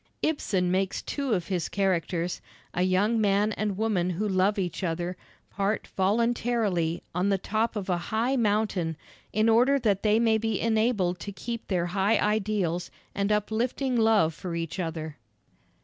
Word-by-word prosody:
Ibsen 190 - 0
makes 190 +1 0
two 280 -4 -2
of 180 -3 -1
his 180 -4 -1
characters, 180 -3 -1 0.3
a 180 - -1
young 200 +5 +2
man 205 +1 +2
and 210 -2 -2
woman 205 -5 +1
who 190 +4 -1
love 195 +1 +2
each 180 -1 -2
other, 175 +1 -2 0.4
part 200 +1 -1
voluntarily 210 -4 +1
on 180 +3 +1
the 195 - +2
top 220 +4 -1
of 205 -3 -3
a 180 -2 +1
high 235 +5 +1
mountain 205 - 0 0.3
in 215 +2 +2
order 245 +5 +5
that 210 -7 +1
they 215 +1 +3
may 225 -1 +3
be 225 -2 -1
enabled 220 -6 +1
to 200 - -6
keep 230 +4 -6
their 180 -3 0
high 195 +4 +2
ideals 200 -5 0 0.2
and 200 +1 0
uplifting 230 +5 0
love 220 -8 +4
for 170 +2 -6
each 165 +2 -4
other. 160 -3 -4
200 Hz, 160 wpm, -27 LUFS, 180-220 Hz, 0.4 s, order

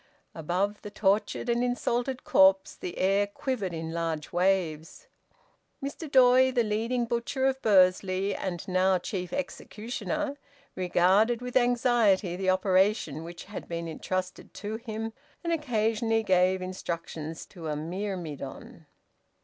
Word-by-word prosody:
Above 185 +6 -1
the 205 - -7
tortured 205 +3 0
and 235 0 +1
insulted 245 +1 -1
corpse 190 0 +4
the 180 - -7
air 195 +2 +2
quivered 205 -2 -3
in 165 -1 -5
large 165 -3 -3
waves. 175 - 0 0.7
Mr 285 +3 -6
Doy, 260 -1 +6
the 245 -2 +2
leading 230 +3 0
butcher 235 +3 -1
of 265 0 +1
Bursley, 190 -1 +3
and 185 0 -4
now 185 0 +3
chief 180 0 -4
executioner, 280 +3 -4 0.4
regarded 190 +6 +3
with 250 0 -7
anxiety 240 -7 +3
the 190 +1 -1
operation 185 -4 +2
which 170 +1 -8
had 210 - -8
been 170 0 -4
entrusted 185 +3 -4
to 215 +2 -4
him, 225 -1 -5 0.3
and 335 -1 0
occasionally 225 -6 +1
gave 185 -1 +3
instructions 165 -3 -5
to 170 -4 -9
a 150 - -1
myrmidon. 175 -1 -6
195 Hz, 125 wpm, -28 LUFS, 180-235 Hz, 0.7 s, Doy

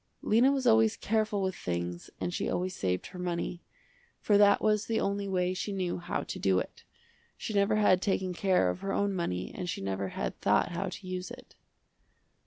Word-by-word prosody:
Lena 240 +6 +4
was 270 -2 -1
always 225 -2 +4
careful 215 -2 0
with 190 0 0
things 85 0 -4
and 175 - -2
she - - -1
always 185 +1 -2
saved 90 -1 -1
her 180 - -9
money, 175 0 -3 0.6
for 210 - +2
that 200 0 +6
was 210 0 +1
the 225 - +1
only 200 0 -1
way 180 -1 0
she 190 +2 -3
knew 185 -3 -2
how 175 - -3
to - - -6
do 95 -1 +2
it. - - -4 0.5
She 220 - -5
never 200 +1 +3
had 195 -4 +4
taken 190 -2 0
care 180 - +2
of 90 - -7
her 195 0 -3
own 200 0 +1
money 95 - -2
and 180 -1 -5
she - - -3
never 95 0 -2
had - - -4
thought - - +2
how 175 +3 -2
to 185 - -9
use 185 0 -4
it. - - -12
185 Hz, 200 wpm, -30 LUFS, 175-205 Hz, 0.6 s, that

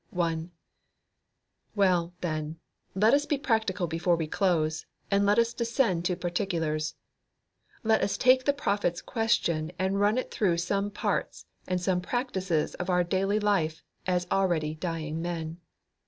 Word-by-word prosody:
1. 165 -2 -1 1.3
Well, 180 -4 +2
then, 155 -1 -3 0.4
let 215 +5 +4
us 290 +1 +3
be 290 - +1
practical 220 - 0
before 170 +2 +1
we 165 -1 -2
close, 155 -2 0 0.2
and 200 0 +3
let 205 +2 +4
us 235 0 +3
descend 230 -7 0
to 180 - +1
particulars. 170 -4 -2 0.9
Let 220 -1 +3
us 200 - 0
take 255 +1 +4
the 285 - +5
prophet's 200 -9 0
question 170 -9 0
and 190 +1 0
run 205 +3 +3
it 255 - -2
through 180 -5 +1
some 200 +4 0
parts 205 - -2 0.2
and 185 -1 0
some 180 0 0
practices 190 - -1
of 180 +1 -5
our 180 -1 +3
daily 195 +4 +1
life 175 -7 0 0.2
as 180 -1 +1
already 170 -6 +1
dying 160 -1 -3
men. 165 -1 -4
180 Hz, 145 wpm, -28 LUFS, 165-205 Hz, 1.3 s, the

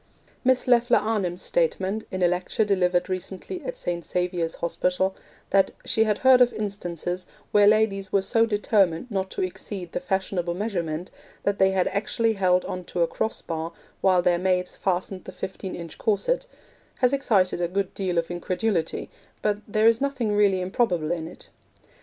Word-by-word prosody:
Miss 260 -1 +3
Leffler 245 0 +5
Arnim's 200 -5 -1
statement, 220 - 0
in 185 -1 -2
a - - +6
lecture 180 +5 0
delivered 180 -3 +2
recently 190 - -5
at - - -5
St. 170 -1 -3
Saviour's 175 -2 -1
Hospital, 180 +3 0 0.4
that 195 -1 +4 0.2
'she 220 - +3
had 210 -1 +1
heard 260 -1 +6
of 245 0 +6
instances 180 -4 -4 0.2
where 205 -1 +6
ladies 205 -3 +2
were 195 -1 +2
so 225 +3 +3
determined 205 -1 +1
not 190 -1 -1
to - - -3
exceed 185 0 -5
the - - -2
fashionable 190 -7 -1
measurement 175 -5 -3 0.3
that 200 0 0
they 190 - +5
had 190 -1 +1
actually 225 +2 0
held 185 -3 +2
on 180 - -4
to 175 0 0
a - - +2
cross 220 - -3
bar 165 0 -4 0.3
while 185 -2 +4
their 175 -1 +3
maids 180 0 0
fastened 185 0 -2
the - - -7
fifteen 190 0 -6
inch 170 -2 -9
corset,' - - +1 0.5
has 250 +1 +3
excited 200 -10 +2
a 175 - +1
good 190 +2 -2
deal 185 -3 -2
of 170 +1 0
incredulity, 175 0 -1 0.4
but 210 -1 +2
there 215 +1 +1
is 230 +1 +5
nothing 255 -7 0
really 200 -3 +3
improbable 180 -4 0
in 165 -2 -2
it. 175 - -11
190 Hz, 170 wpm, -25 LUFS, 180-215 Hz, 0.5 s, a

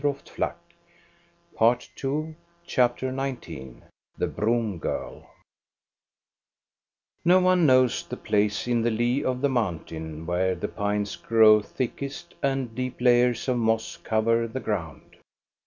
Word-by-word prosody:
THE 145 - +1
BROOM 140 -1 -1 0.2
GIRL - - -1 1.0
403 135 +6 0 0.3
CHAPTER 130 -2 +1
XIX 85 - -6 0.3
THE - - 0
BROOM 110 -4 -1
GIRL - - -5 2.0
No 180 +2 +6
one 185 -3 +4
knows 130 -2 +4
the - - -6
place 105 +2 0
in 120 -1 +2
the 120 - +2
lee 120 +4 0
of 130 -1 -1
the 140 - +2
mountain 80 - -3
where 90 +2 0
the 85 - -4
pines 105 -1 -2
grow 110 -2 +5
thickest 140 +9 -5
and 135 -4 -1
deep 130 +1 -4
layers 125 0 +3
of 125 -1 +1
moss 110 -1 0
cover 115 +1 +1
the 130 +4 -5
ground. 85 - -5
120 Hz, 125 wpm, -26 LUFS, 105-130 Hz, 2.0 s, No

